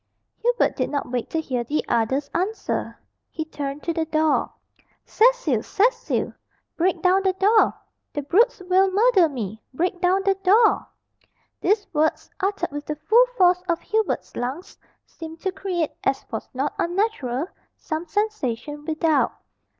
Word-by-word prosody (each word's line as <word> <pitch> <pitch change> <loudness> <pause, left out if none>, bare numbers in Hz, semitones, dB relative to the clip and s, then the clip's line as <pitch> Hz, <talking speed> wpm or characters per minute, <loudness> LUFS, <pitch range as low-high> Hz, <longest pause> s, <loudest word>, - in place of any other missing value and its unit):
Hubert 485 +1 +1
did - - -1
not 285 -4 -3
wait 245 -2 -2
to 325 - -1
hear 255 -6 -2
the 290 +6 -2
other's 250 +5 +1
answer. 385 +6 -2 0.3
He 315 - -4
turned 285 -2 -5
to 335 - -1
the 325 -1 -1
door. 310 -1 +1 0.5
"Cecil! 445 - +3
Cecil! 470 - 0 0.4
break 350 0 0
down 370 +1 +4
the 380 -1 +1
door. 415 +4 +3 0.4
The 290 - -4
brutes 420 - +3
will 380 +1 +4
murder 395 -3 +4
me! 220 -6 -5
Break 355 +3 -1
down 370 +2 +2
the 390 - +4
door!" 425 +4 +4 0.7
These 410 +1 +1
words, 310 +1 0
uttered 390 -4 -1
with 290 0 -6
the 300 - -2
full 440 +12 +4
force 360 -2 +4
of 335 0 +1
Hubert's 440 -2 -1
lungs, 270 +10 -4 0.3
seemed 325 0 -10
to 380 - -1
create, 360 -4 -2
as 270 - 0
was 220 - -5
not 275 +3 -2
unnatural, 340 - -1 0.3
some 320 +1 -4
sensation 300 - -2
without. 315 -2 +2
335 Hz, 150 wpm, -23 LUFS, 290-390 Hz, 0.7 s, down